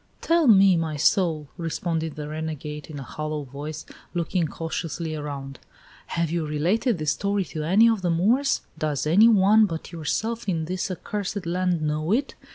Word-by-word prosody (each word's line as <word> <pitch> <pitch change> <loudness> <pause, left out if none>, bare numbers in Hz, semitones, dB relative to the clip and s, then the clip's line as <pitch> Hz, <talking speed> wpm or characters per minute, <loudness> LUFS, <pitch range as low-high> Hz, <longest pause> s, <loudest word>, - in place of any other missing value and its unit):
"Tell 330 -2 +2
me, 195 -4 +7
my 160 -2 -2
soul," 155 -2 +2
responded 165 -1 -2
the 150 -1 -6
renegade, 150 -1 -5
in 150 - -7
a 140 - -6
hollow 155 +2 -4
voice, 145 +3 -7 0.3
looking 170 0 0
cautiously 165 0 -4
around, 140 -3 -6 0.5
"have 170 -2 -1
you 170 -1 0
related 180 - +1
this 155 -1 0
story 200 +5 -1
to 155 - -3
any 190 +9 +5
of 225 -3 +2
the 180 - 0
Moors? 230 +12 +2 0.2
Does 150 -2 -1
any 190 +9 +6
one 215 0 +5
but 165 -3 -6
yourself 220 +7 -2
in 165 -3 -1
this 185 +4 -3
accursed 200 +1 -4
land 175 -1 0
know 155 +3 -1
it? 265 +6 +1
165 Hz, 165 wpm, -25 LUFS, 155-195 Hz, 0.5 s, me